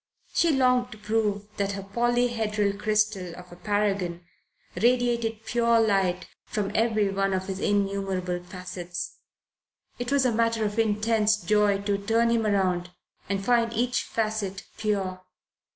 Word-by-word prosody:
She 335 - +3
longed 250 -2 +2
to - - -12
prove 210 -1 -1
that 200 0 0
her 195 -1 -5
polyhedral 225 -1 +1
crystal 210 -5 0
of 180 0 -12
a - - -10
paragon 195 -3 -1 0.5
radiated 235 -2 +1
pure 235 -1 +3
light 195 -4 +1 0.2
from 205 -2 -3
every 215 -2 +2
one 195 0 0
of 185 0 -2
his 190 0 -4
innumerable 195 -3 -1
facets. 180 -1 -6 0.8
It 245 +1 -3
was 280 -2 +3
a 250 - +3
matter 230 -1 +1
of 210 +2 -2
intense 215 0 +2
joy 205 +1 +2
to 200 -1 0
turn 230 +3 +2
him 230 -1 +2
round 185 -3 +1 0.4
and 195 -1 -1
find 235 -1 +3
each 245 +2 +1
facet 215 -3 -2
pure. 195 -4 -2
210 Hz, 140 wpm, -26 LUFS, 195-230 Hz, 0.8 s, She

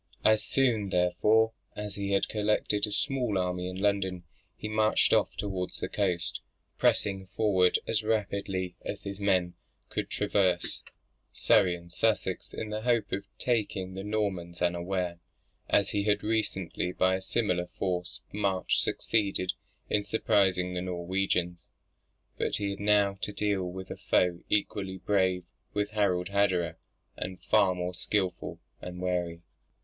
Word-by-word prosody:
As 110 0 +5
soon 115 -7 +2
therefore, 105 +5 +3 0.2
as 105 -1 -5
he 100 -1 -3
had 100 - +2
collected 105 0 +1
a - - -6
small 125 -4 +1
army 90 0 -1
in 90 - -6
London, 95 -3 0 0.3
he - - -5
marched 110 0 +3
off - - +3
towards 95 -3 -3
the - - -2
coast: 90 -4 -1 0.4
pressing 95 -2 +2
forward 95 -3 +3
as 115 -1 +1
rapidly 100 -4 -1
as 100 - -5
his 100 0 -5
men 95 -3 +2 0.4
could - - -3
traverse 95 -4 +1 0.5
Surrey 90 -2 +4
and 85 0 -13
Sussex 100 -1 0
in 110 -1 -5
the 105 0 -2
hope 115 -4 +1
of 100 +1 -2
taking 100 -6 -1
the 95 +1 -5
Normans 95 -5 -2
unawares, 90 0 -1 0.5
as 100 -1 +3
he 100 - +1
had 105 -1 +2
recently 95 -5 -1
by 95 0 +2
a - - -8
similar 90 -4 0
forced 90 -2 -2
march 100 -2 +1
succeeded 100 -4 0 0.3
in 105 - +1
surprising 95 -4 +2
the 90 - -2
Norwegians. 90 -1 -1 0.7
But - - 0
he 100 -1 -1
had 100 - -6
now 100 -1 +3
to - - -2
deal 100 -3 -1
with 95 +1 -7
a - - -5
foe 90 -1 +2
equally 100 -2 0
brave 95 -2 +1 0.3
with 105 0 0
Harald 95 -4 +1
Hardrada, 90 -5 +1 0.4
and 95 0 -5
far 95 -2 +3
more 90 0 -3
skilful 90 0 -1 0.2
and 90 0 -7
wary. 90 -2 -2
95 Hz, 145 wpm, -29 LUFS, 90-105 Hz, 0.7 s, As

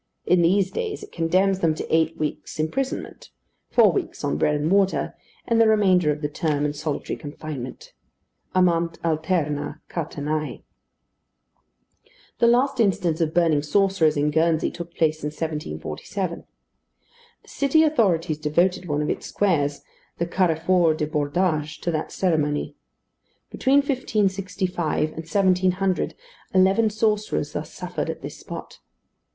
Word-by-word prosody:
In 180 -1 +4
these 190 +3 +3
days 430 -3 -4
it 415 - -11
condemns 185 +3 +2
them 165 -4 +2
to 160 - -1
eight 160 0 +1
weeks' 155 +1 -4
imprisonment; 255 +13 -3 0.4
four 220 -5 +5
weeks - - -4
on 145 - 0
bread 150 - +2
and 150 +3 -1
water, 195 -1 +2 0.3
and 230 -1 +3
the 225 - +6
remainder 190 -7 +4
of 150 +1 -5
the - - +2
term 145 0 -1
in 145 - -1
solitary 150 0 -3
confinement. 145 -4 -8 0.6
Amant 170 -2 +2
alterna 155 -2 -1
catenæ. 155 -2 -3 1.8
The 235 - +5
last 255 +3 +3
instance 185 -6 +1
of 160 -1 0
burning 165 -4 +3
sorcerers 165 -1 +2
in 150 +1 +1
Guernsey 160 +1 +2
took 170 0 -7
place 155 -1 +1
in 150 - -2
1747. 155 - -4 1.0
The - - -25
city 285 +3 +3
authorities 180 - +2
devoted 175 +4 +1
one 150 -1 0
of - - -2
its - - -4
squares, 145 -8 0 0.3
the 170 - 0
Carrefour 170 -1 +2
du 155 - -1
Bordage, 150 +1 -1
to 175 - -1
that 155 -1 -3
ceremony. 150 -5 0 0.8
Between 275 +2 +3
1565 190 - -1
and 155 - -15
1700, 185 +2 +1 0.4
eleven 195 +4 +4
sorcerers 215 0 0
thus - - -5
suffered - - -4
at - - -5
this - - -7
spot. - - -9
170 Hz, 135 wpm, -24 LUFS, 155-195 Hz, 1.8 s, the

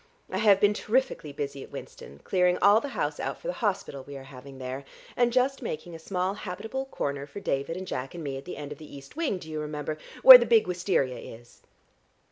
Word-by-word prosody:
I - - -1
have 205 -3 +5
been 205 +1 +4
terrifically 225 - -1
busy 140 -1 -5
at - - -10
Winston, 70 +1 -10
clearing 180 -1 +2
all 205 +2 +6
the 285 - -4
house - - -1
out - - -3
for - - -19
the - - -1
hospital 190 - -2
we 140 0 -9
are 135 - -10
having 135 0 -12
there, 130 +1 -5 0.3
and 245 -1 +3
just 260 +3 +1
making 170 -6 -5
a 165 - -8
small 185 +3 -2
habitable 215 +7 -5
corner 140 - -4
for 175 - -8
David 140 -2 -2
and 185 - -5
Jack 135 -4 -5
and 170 - -6
me 140 -2 -4
at 135 - -8
the - - -7
end 145 -1 -7
of 150 - -8
the 155 -2 -11
east 140 0 -12
wing, 315 - -1
do 170 - -11
you 155 -1 -4
remember, 150 0 -4 0.2
where 260 -1 +13
the 240 - 0
big 225 -1 +5
wisteria 175 -8 0
is. 120 +1 -13
170 Hz, 230 wpm, -27 LUFS, 140-210 Hz, 0.3 s, where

